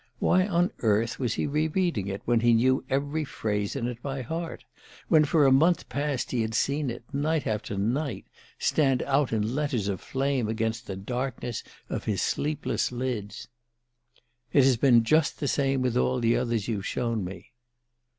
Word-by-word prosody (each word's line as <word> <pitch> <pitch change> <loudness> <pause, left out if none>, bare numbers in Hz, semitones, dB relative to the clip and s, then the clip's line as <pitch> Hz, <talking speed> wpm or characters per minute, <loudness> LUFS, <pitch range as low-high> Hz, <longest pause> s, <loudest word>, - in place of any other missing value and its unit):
Why 185 +1 +3
on 175 -2 +2
earth 110 +1 +1
was 125 -4 -1
he - - -1
re 150 +2 +1
reading 160 - 0
it, 100 0 -5
when 120 -1 +3
he 120 0 +4
knew 130 +4 +3
every 145 +3 0
phrase 105 -6 -2
in 130 -4 -2
it 125 -1 -6
by 135 -1 -4
heart, 165 +6 -5 0.4
when 155 -2 +6
for 150 0 +3
a 135 - +5
month 165 +6 +3
past 140 0 -2
he 120 - 0
had 110 0 -2
seen 140 +2 0
it, 120 0 -6
night 150 +2 0
after 105 -1 -2
night, 130 +9 -1 0.3
stand 135 -4 +2
out 140 -1 +1
in 110 +1 0
letters 135 -8 -1
of 95 -3 -2
flame 135 -3 -1
against 110 +1 -2
the 95 - -4
darkness 120 +3 -4 0.2
of - - -4
his 100 -4 0
sleepless 150 -3 -1
lids? 120 -5 -4 1.0
"_It 140 - +5
has 130 -1 +5
been 120 -1 +5
just 155 +6 +2
the 145 - -1
same 135 -1 +1
with 125 -2 0
all 125 0 +2
the 115 0 +2
others 120 -4 -1
you've 105 -5 -2
shown 115 -4 -1
me. 90 0 -8
125 Hz, 180 wpm, -27 LUFS, 115-145 Hz, 1.0 s, when